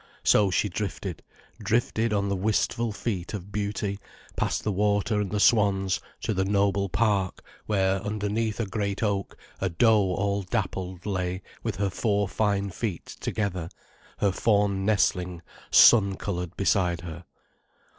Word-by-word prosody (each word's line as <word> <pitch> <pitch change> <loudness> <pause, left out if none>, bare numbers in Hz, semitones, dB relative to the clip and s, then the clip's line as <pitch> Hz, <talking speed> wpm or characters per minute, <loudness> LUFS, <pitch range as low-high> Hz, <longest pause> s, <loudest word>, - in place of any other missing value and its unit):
So 105 -2 +4
she 95 +3 +1
drifted, 95 -2 -4 0.4
drifted 115 +1 0
on 100 -1 +1
the 100 - 0
wistful 110 +3 0
feet 100 -3 -3
of 100 0 -8
beauty, 100 -1 -2 0.4
past - - -1
the 105 - 0
water 105 +2 +1
and 100 - -2
the 105 - -1
swans, 100 -5 +3 0.2
to - - -1
the 95 -1 +1
noble 100 0 +1
park, 100 -2 0 0.2
where, 95 -2 +1
underneath 105 +1 -2
a 115 - 0
great 100 0 -2
oak, 100 -2 -1 0.2
a 95 - 0
doe 100 0 +3
all 100 +1 0
dappled 95 -1 -3
lay 90 -2 -2 0.2
with - - -3
her 100 +1 -1
four 105 0 0
fine 100 -1 0
feet 95 -3 -4
together, 95 -6 -3 0.5
her 100 - +2
fawn 100 -1 +1
nestling 90 -4 +1 0.3
sun 100 -5 +7
coloured 90 -4 -4
beside 90 -3 +1
her. 85 +1 -8
100 Hz, 145 wpm, -26 LUFS, 95-105 Hz, 0.5 s, sun